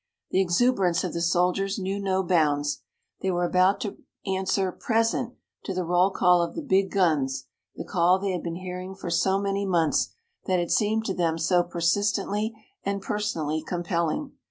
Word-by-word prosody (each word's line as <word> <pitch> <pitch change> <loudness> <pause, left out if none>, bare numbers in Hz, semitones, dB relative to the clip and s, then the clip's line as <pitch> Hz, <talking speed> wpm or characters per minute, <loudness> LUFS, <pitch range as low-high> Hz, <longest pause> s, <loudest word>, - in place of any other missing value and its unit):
The 190 - +3
exuberance 185 -2 +2
of 180 - -3
the 170 - -2
soldiers 180 +4 +1
knew 195 0 -2
no 190 -1 0
bounds. 150 -5 +1 0.4
They 190 - 0
were 175 -1 +1
about 185 +3 +3
to 205 -5 -4 0.3
answer 190 0 0
"present" 230 +4 0 0.3
to 190 - -3
the 185 - -1
roll 180 +2 +3
call 180 -2 +4
of 170 - -3
the 325 - -4
big 195 -7 +2
guns, 140 -9 +1 0.3
the - - -6
call 180 0 +3
they 195 0 -2
had 180 -2 -2
been 170 -1 -4
hearing 185 +1 -6
for 185 -3 -6
so 190 +3 +2
many 200 0 -1
months, 170 -5 +2 0.4
that 185 -2 +2
had 175 -1 -1
seemed 220 +1 +2
to 195 - -1
them 165 -3 0
so 175 +2 +3
persistently 205 +5 0 0.3
and 200 0 -1
personally 165 -8 -2
compelling. 175 - -2
185 Hz, 175 wpm, -26 LUFS, 170-195 Hz, 0.4 s, call